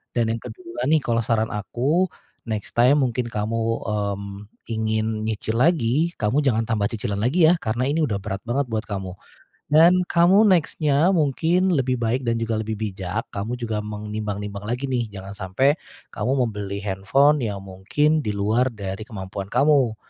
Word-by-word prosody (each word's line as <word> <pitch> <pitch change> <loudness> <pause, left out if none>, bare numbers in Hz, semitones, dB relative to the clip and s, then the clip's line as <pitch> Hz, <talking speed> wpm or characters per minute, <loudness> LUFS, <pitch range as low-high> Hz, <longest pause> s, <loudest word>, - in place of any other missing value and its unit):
Dan 115 -2 +1
yang 115 - -5
ke-2 355 -1 -8
nih, 160 0 +5
kalau 115 -1 +1
saran 110 0 0
aku, 140 - 0 0.4
next 110 -2 -4
time 130 +4 +5
mungkin 125 -1 -1
kamu, 110 0 -2 0.3
mmm, 100 -1 -3 0.2
ingin 110 -1 -1
nyicil 110 0 -2
lagi, 155 0 +2
kamu 120 +7 +2
jangan 115 -5 +2
tambah 105 -3 +1
cicilan 110 -3 -3
lagi 155 +7 +4
ya, 170 - +5
karena 120 +1 -1
ini 150 +4 +1
udah 110 -9 0
berat 100 0 -4
banget 135 +4 0
buat 110 -1 -1
kamu. 95 -3 -4 0.6
Dan 170 +4 +6
kamu 180 +6 +5
next-nya 155 -2 +2
mungkin 165 +5 +2
lebih 130 -4 +1
baik 120 +3 0
dan 115 - +2
juga 115 -1 -1
lebih 110 0 -3
bijak, 100 0 -3
kamu 105 +5 -3
juga 110 -3 -3
menimbang-nimbang 105 -1 -5
lagi 125 +4 -2
nih, 120 -3 0
jangan 100 -1 -9
sampe 100 +10 +2 0.4
kamu 110 +5 -1 0.2
membeli 100 -2 -5
handphone 120 +10 +3
yang 105 -4 -3
mungkin 105 +12 0
di - - -1
luar 110 +5 +2
dari 100 -2 -5
kemampuan 95 -1 -6
kamu. 140 -5 +3
115 Hz, 165 wpm, -23 LUFS, 105-140 Hz, 0.6 s, Dan